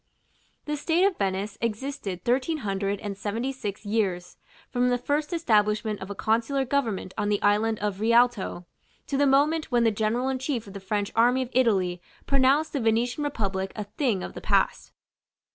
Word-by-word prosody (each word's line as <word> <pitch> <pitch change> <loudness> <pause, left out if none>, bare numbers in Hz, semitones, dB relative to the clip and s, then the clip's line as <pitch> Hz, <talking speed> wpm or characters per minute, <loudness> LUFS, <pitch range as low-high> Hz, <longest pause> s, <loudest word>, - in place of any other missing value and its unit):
The 300 0 -2
state 330 +4 +1
of 395 -3 0
Venice 195 +2 -2
existed 220 -5 -3
Thirteen 265 +3 0
Hundred 195 0 -1
and 205 -2 -4
Seventy 220 +6 -3
six 220 -6 -6
years, 190 -4 -1 0.3
from 250 0 +1
the 245 - +2
first 295 +5 -1
establishment 215 -9 +1
of 190 - -7
a 200 - -5
consular 235 +7 0
government 235 -9 -1
on 205 0 0
the 205 -1 +1
island 215 +2 +2
of 205 -2 -3
the 220 +2 0
Rialto, 235 -7 +2 0.4
to 280 - -3
the 285 +1 +3
moment 295 +4 +3
when 240 -1 +3
the 225 - +4
General 220 +4 0
in 265 -1 -1
chief 255 -3 -2
of 200 - -11
the 200 - -6
French 200 +1 -2
army 245 +3 +4
of 245 - -9
Italy 190 -8 +2 0.2
pronounced 275 +3 +3
the 285 - 0
Venetian 235 +5 +1
republic 195 -9 -2
a 215 - -3
thing 210 -1 -1
of - - -6
the - - -8
past. - - +1
225 Hz, 185 wpm, -26 LUFS, 205-265 Hz, 0.4 s, the